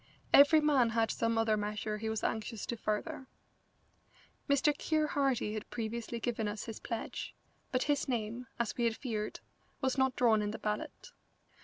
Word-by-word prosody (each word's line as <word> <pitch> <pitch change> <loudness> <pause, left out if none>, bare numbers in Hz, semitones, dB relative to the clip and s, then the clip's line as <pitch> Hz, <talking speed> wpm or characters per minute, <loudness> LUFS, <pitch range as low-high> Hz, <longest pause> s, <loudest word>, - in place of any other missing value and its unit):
Every 295 +3 +8
man 280 -6 +4
had 225 -1 +1
some 230 0 0
other 225 -1 +3
measure 210 0 -2
he 220 +1 -2
was 220 -1 -2
anxious 220 -1 -2
to 235 - -3
further. 245 +6 -3 1.2
Mr. 280 +1 +4
Keir 310 +1 +1
Hardie 270 -7 +1
had 215 -1 -5
previously 235 +1 -4
given 225 -2 -1
us 210 0 -4
his 225 -2 -7
pledge, 230 -2 -5 0.4
but 255 0 +1
his 290 -1 +1
name, 235 0 -2
as 235 -2 -1
we 240 - +1
had 230 -1 +1
feared, 215 -5 -3 0.4
was 265 0 0
not 265 -1 +3
drawn 225 -3 +4
in 205 - -1
the 215 - -4
ballot. 210 - -4
230 Hz, 170 wpm, -33 LUFS, 215-265 Hz, 1.2 s, Every